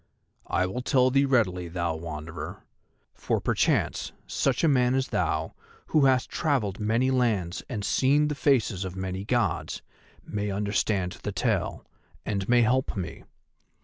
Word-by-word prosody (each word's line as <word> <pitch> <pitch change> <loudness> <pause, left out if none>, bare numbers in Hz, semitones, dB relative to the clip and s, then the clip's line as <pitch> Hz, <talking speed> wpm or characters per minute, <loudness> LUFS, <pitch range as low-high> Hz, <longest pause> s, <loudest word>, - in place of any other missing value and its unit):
"I 95 - +1
will 95 +7 -3
tell 130 0 +3
thee 140 +2 +4
readily, 95 -10 +1
thou 85 -1 -2
Wanderer, 80 0 -7 0.5
for - - -1
perchance - - 0
such - - 0
a - - +5
man 125 -3 +3
as 135 0 0
thou, 80 -2 -1 0.4
who 150 -3 +4
hast 130 -1 +3
travelled 120 - -1
in 105 - -2
many 120 +4 +2
lands 105 -9 0
and 105 -5 -3
seen 140 +8 +3
the 150 - -1
faces 120 -9 +1
of 95 -1 -5
many 95 0 -4
Gods, 120 +3 -1 0.4
may 105 0 -3
understand 100 -2 -1
the - - -3
tale, - - -1 0.4
and 100 -1 -2
may 120 -1 +5
help 130 0 +1
me. 85 -3 -5
105 Hz, 150 wpm, -27 LUFS, 95-130 Hz, 0.5 s, a